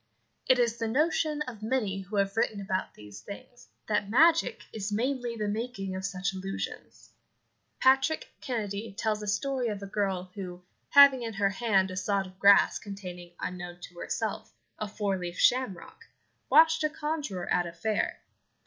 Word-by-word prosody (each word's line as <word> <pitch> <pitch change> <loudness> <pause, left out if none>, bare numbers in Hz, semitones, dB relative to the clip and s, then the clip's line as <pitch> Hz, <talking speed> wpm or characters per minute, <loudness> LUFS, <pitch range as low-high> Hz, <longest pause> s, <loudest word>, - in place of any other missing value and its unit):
It 255 - +5
is 235 -2 +1
the 225 - -2
notion 300 +3 +1
of 240 -6 -9
many 215 -4 -1
who 195 +3 -8
have 195 0 +1
written 220 -2 0
about 190 -1 -3
these 105 -1 -11
things 245 - -11 0.2
that 210 -2 0
magic 325 +8 +4
is 210 -1 -4
mainly 240 +2 -1
the 210 -2 -2
making 205 -3 -3
of 190 - -5
such 195 0 -2
illusions. 190 +1 -6 0.7
Patrick 270 - +3
Kennedy 215 -4 -3
tells 215 0 -1
a 210 - -6
story 255 +4 0
of 205 -2 -4
a - - -4
girl 195 -2 -2
who, 180 -2 -7 0.3
having 280 -2 +8
in 225 -1 -4
her 200 -1 +1
hand 195 -3 +1
a - - -6
sod 195 +1 0
of 185 0 -14
grass 200 0 +6
containing, 180 -4 -8
unknown 175 -1 -5
to 175 0 -11
herself, - - -4 0.2
a 215 - -2
four 200 -2 -2
leaved 175 0 -5
shamrock, 255 - +1 0.4
watched 320 +2 +6
a 305 - +2
conjurer 295 - -3
at 175 -1 +2
a - - -6
fair. 200 +6 -2
210 Hz, 165 wpm, -29 LUFS, 190-250 Hz, 0.7 s, having